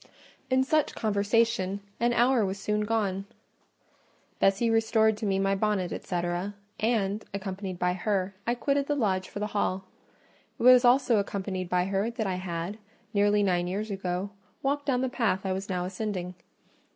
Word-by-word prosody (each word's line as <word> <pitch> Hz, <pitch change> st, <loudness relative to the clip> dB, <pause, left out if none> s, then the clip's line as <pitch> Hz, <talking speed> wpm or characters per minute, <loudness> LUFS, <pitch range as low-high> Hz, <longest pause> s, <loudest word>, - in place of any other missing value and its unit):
In 260 Hz, 0 st, +3 dB
such 305 Hz, +2 st, +1 dB
conversation 205 Hz, -1 st, +1 dB, 0.2 s
an 240 Hz, +1 st, +2 dB
hour 240 Hz, 0 st, +3 dB
was 190 Hz, 0 st, -2 dB
soon 210 Hz, +2 st, -1 dB
gone: 200 Hz, -3 st, -1 dB, 1.1 s
Bessie 195 Hz, +4 st, +3 dB
restored 220 Hz, -1 st, +3 dB
to 215 Hz, -1 st, -3 dB
me 195 Hz, -1 st, +1 dB
my 195 Hz, 0 st, +2 dB
bonnet, 195 Hz, -2 st, 0 dB
&c., 180 Hz, -, -4 dB, 0.6 s
and, 215 Hz, -2 st, 0 dB
accompanied 190 Hz, -1 st, -5 dB
by 180 Hz, 0 st, +1 dB
her, 195 Hz, 0 st, -1 dB
I 240 Hz, -, +2 dB
quitted 280 Hz, +3 st, 0 dB
the 290 Hz, -, +1 dB
lodge 190 Hz, -8 st, 0 dB
for -, -, -8 dB
the 210 Hz, -, -1 dB
hall. 190 Hz, -2 st, 0 dB, 0.7 s
It -, -, -3 dB
was 250 Hz, 0 st, +8 dB
also 245 Hz, -1 st, +4 dB
accompanied 190 Hz, -2 st, -2 dB
by 180 Hz, 0 st, +2 dB
her 195 Hz, +3 st, 0 dB
that 230 Hz, -2 st, -3 dB
I 185 Hz, -2 st, -1 dB
had, 180 Hz, +3 st, -4 dB, 0.3 s
nearly 205 Hz, 0 st, +3 dB
nine 175 Hz, -2 st, +1 dB
years 205 Hz, +4 st, -3 dB
ago, 190 Hz, 0 st, -3 dB, 0.3 s
walked 285 Hz, +1 st, -1 dB
down 255 Hz, -2 st, +2 dB
the 260 Hz, -, +1 dB
path 225 Hz, -7 st, 0 dB
I 190 Hz, -, 0 dB
was 195 Hz, +2 st, -5 dB
now 180 Hz, -1 st, -1 dB
ascending. 185 Hz, -1 st, -4 dB
205 Hz, 165 wpm, -28 LUFS, 190-230 Hz, 1.1 s, was